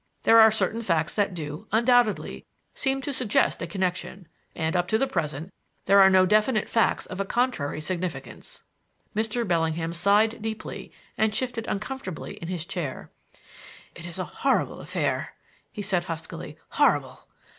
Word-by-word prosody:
There 225 - +7
are 220 0 +9
certain 220 +1 0
facts 165 -6 0
that 200 -3 0
do, 150 -2 -6
undoubtedly, 235 -1 +2 0.3
seem 270 0 -1
to 285 - -3
suggest 250 -5 +1
a 170 - -3
connection, 185 0 -3 0.3
and, 160 +1 -1
up 175 0 +1
to 220 - +2
the 270 - +2
present, 165 - -3 0.3
there 200 0 +6
are 190 - +8
no 185 -1 +5
definite 215 +3 +2
facts 225 - +2
of 185 - -7
a - - +2
contrary 200 - -1
significance." 180 +2 -5 0.5
Mr. 220 +2 0
Bellingham 165 -1 0
sighed 210 +6 +3
deeply 220 0 -6 0.3
and 220 -1 +2
shifted 240 -3 -2
uncomfortably 210 -4 -5
in 165 - -7
his 175 -2 -3
chair. 175 -8 -5 0.8
"It 170 0 -9
is 175 - -7
a 185 - -1
horrible 265 - 0
affair!" - - -2 0.4
he 205 - -6
said 180 -3 0
huskily; 165 0 -6
"horrible! - - +1
195 Hz, 155 wpm, -26 LUFS, 170-225 Hz, 0.8 s, are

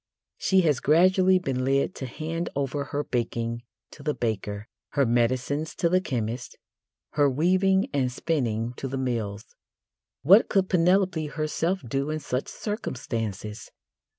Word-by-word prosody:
She 190 -1 +3
has 150 -7 +2
gradually 185 +4 +4
been 135 -8 -2
led 135 +6 +1
to 130 - -4
hand 165 +6 -4
over 140 +1 -1
her 145 +2 -2
baking 115 -2 -2 0.3
to - - -13
the 150 +1 -1
baker, 105 -2 -3 0.3
her 140 -2 +3
medicines 125 +6 0
to 170 - +1
the 185 +1 +3
chemist, 120 -5 -4 0.5
her 145 -1 +3
weaving 185 - +2
and 130 -2 +1
spinning 120 -6 -1
to 135 - -4
the 135 +1 -4
mills. 115 -5 -2 0.8
What 195 +9 +7
could 190 -1 +2
Penelope 180 -2 +2
herself 160 +4 -1
do 135 +5 -1
in 155 - -1
such 130 -2 -3
circumstances? 115 - -4
140 Hz, 140 wpm, -26 LUFS, 120-170 Hz, 0.8 s, What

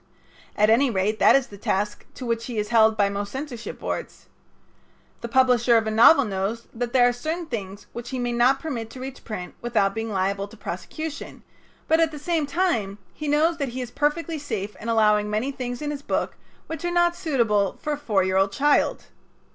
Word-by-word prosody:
At 210 +1 +4
any 260 +4 +4
rate, 210 0 0
that - - +6
is 275 -2 +3
the 200 -3 -13
task 205 +1 -2
to 255 - -7
which 230 -1 -2
he 240 -3 -5
is 210 0 -1
held 220 -1 +4
by 200 - +4
most 200 0 -4
censorship 265 -4 -6
boards. - - -5 1.0
The 235 - -4
publisher 245 -1 +4
of 225 - +1
a 220 - -1
novel 250 +6 +7
knows 205 +3 -3
that 235 +1 -3
there 245 -1 +5
are 245 - +1
certain 320 +8 -3
things 200 -8 -6
which 240 0 -7
he 260 - -4
may 245 -1 -1
not 245 +3 +3
permit 245 -8 -4
to 255 - -10
reach 265 +1 -8
print 185 -5 -6
without 220 -5 +1
being 225 +1 -3
liable 195 +1 -1
to 225 - -15
prosecution, 290 - -6 0.4
but 320 +1 +3
at 325 -1 +4
the 300 - -8
same 310 0 -1
time 275 - 0 0.2
he 305 - -6
knows 310 +3 +2
that 280 -4 -2
he - - -2
is 245 -1 -6
perfectly 310 +3 -1
safe 215 -8 -4
in 230 - -4
allowing 210 -2 +3
many 215 +6 -1
things 250 0 -5
in 295 - -2
his 285 -1 -5
book - - -2 0.3
which 320 - -6
are 350 - 0
not 345 0 +2
suitable 225 - +1
for 300 - -2
a - - -3
four 210 -10 +1
year 190 0 +1
old 195 +1 +3
child. 290 +7 +2
240 Hz, 210 wpm, -24 LUFS, 210-290 Hz, 1.0 s, novel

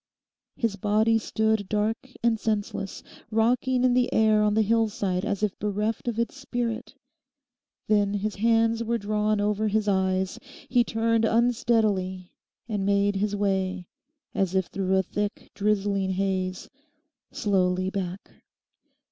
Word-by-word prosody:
His 230 -6 -1
body 215 +3 +2
stood 220 -2 0
dark 215 +4 -1
and 230 -2 +2
senseless, 205 -3 -3 0.3
rocking 245 +3 +2
in 255 -1 +4
the 250 0 +2
air 215 -1 +4
on 210 0 +2
the 220 - +4
hillside 210 -4 0
as 205 0 -2
if 210 - -1
bereft 210 +3 -2
of 235 -2 -1
its 235 +3 -1
spirit. 245 -4 -4 0.9
Then 205 -1 +2
his 205 0 -2
hands 230 +1 +2
were 235 +1 0
drawn 210 0 0
over 210 +1 +1
his 215 0 0
eyes. 190 -1 0 0.3
He 245 -2 +3
turned 230 0 +1
unsteadily 220 -6 +1 0.4
and 210 -4 -2
made 200 0 +2
his 205 +1 0
way, 190 -2 -1 0.4
as 190 -1 0
if 190 -1 +2
through 190 0 0
a 190 - +3
thick, 205 +4 -4
drizzling 200 -2 0
haze, 185 -1 -2 0.6
slowly 185 -3 +1
back. 190 -1 -5
210 Hz, 135 wpm, -26 LUFS, 195-225 Hz, 0.9 s, in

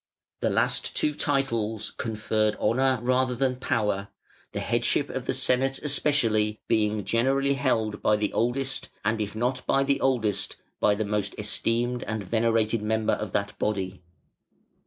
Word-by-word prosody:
The - - +1
last - - +2
two 150 - +2
titles 115 -8 -1
conferred 110 -1 0
honour 130 +4 +2
rather 130 0 +2
than 130 0 0
power; 105 -5 -1 0.4
the - - -3
headship - - +1
of - - -4
the - - 0
Senate 135 +2 +2
especially 115 -8 +1
being 105 -2 +1
generally 135 +6 +2
held 115 -6 0
by 105 - +3
the 105 -1 -1
oldest, 130 +4 -1 0.2
and 110 +1 +1
if 105 0 -4
not 125 +3 -1
by 135 - +3
the 135 0 0
oldest, 110 -7 0 0.2
by 105 - +3
the 110 +1 -2
most 105 -1 -2
esteemed 120 +3 0
and 110 -2 -3
venerated 115 +1 +1
member 110 0 +1
of 105 -3 -3
that 100 -1 -1
body. 95 -3 -2
110 Hz, 150 wpm, -26 LUFS, 105-130 Hz, 0.4 s, by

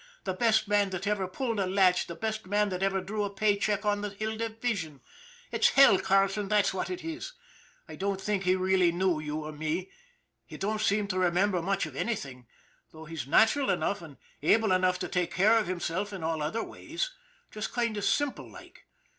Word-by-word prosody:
" - - -31
The - - -2
best 220 -2 +2
man 205 -1 +2
that 185 +1 -4
ever 200 -2 0
pulled 230 +3 -3
a 190 - +1
latch, 185 -1 +3
the 170 - -6
best 215 +3 -4
man 205 +1 +1
that 185 -1 -4
ever 195 0 +1
drew 205 +3 -3
a 205 - -2
pay 205 +1 +1
check 205 0 -1
on 205 0 +1
the 210 - -3
Hill 215 +2 -4
Division. 220 - -3 0.5
It's - - +4
hell, 270 -8 +6
Carleton, 195 +1 +2
that's 210 -1 +2
what 190 - -3
it 365 -1 -5
is. 330 +9 -6 0.5
I - - -9
don't 195 0 -1
think 200 0 -1
he 185 0 +2
really 185 -1 +3
knew 175 -2 +1
you 155 0 -4
or 155 - -5
me. 155 +4 -3 0.6
He - - -9
don't 210 +2 -2
seem 210 -1 +2
to 185 -1 -1
remember 180 +1 +2
much 195 0 0
of 155 -4 -9
anything, 135 - -4 0.4
though 160 0 -11
he's 160 -5 -6
natural 225 - +4
enough 200 - 0
and 150 -5 -12 0.2
able 215 +7 +3
enough 185 0 +3
to - - -4
take 180 -1 -2
care 215 +5 +5
of 215 - -2
himself 185 +2 -2
in 190 -4 -6
all 160 -1 -1
other 190 +10 -2
ways. 340 +11 -5 0.4
Just 215 0 -5
kind 235 -3 -1
of 205 - -4
simple 270 +8 0
like. 355 0 -15
195 Hz, 210 wpm, -29 LUFS, 180-215 Hz, 0.6 s, hell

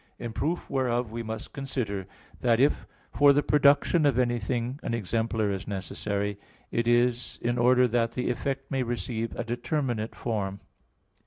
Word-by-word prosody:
In 115 -2 -6
proof 165 +8 -2
whereof 125 -4 0
we 115 +1 -4
must 110 -1 -6
consider 115 -9 -3 0.3
that 120 -2 +3
if 140 +3 +2 0.2
for 145 0 +6
the 145 +1 +2
production 145 +3 +4
of 135 -4 +2
anything 120 +1 0
an 115 - -2
exemplar 110 0 0
is 95 -1 -4
necessary, 100 0 -3 0.3
it 115 0 0
is 120 0 +2
in 120 +1 0
order 125 +1 +5
that 115 -1 +1
the 125 0 -1
effect 135 +2 -3
may 135 -1 +1
receive 120 -1 -3
a - - -2
determinate 120 -1 -2
form. 100 -4 -3
120 Hz, 155 wpm, -27 LUFS, 110-130 Hz, 0.3 s, for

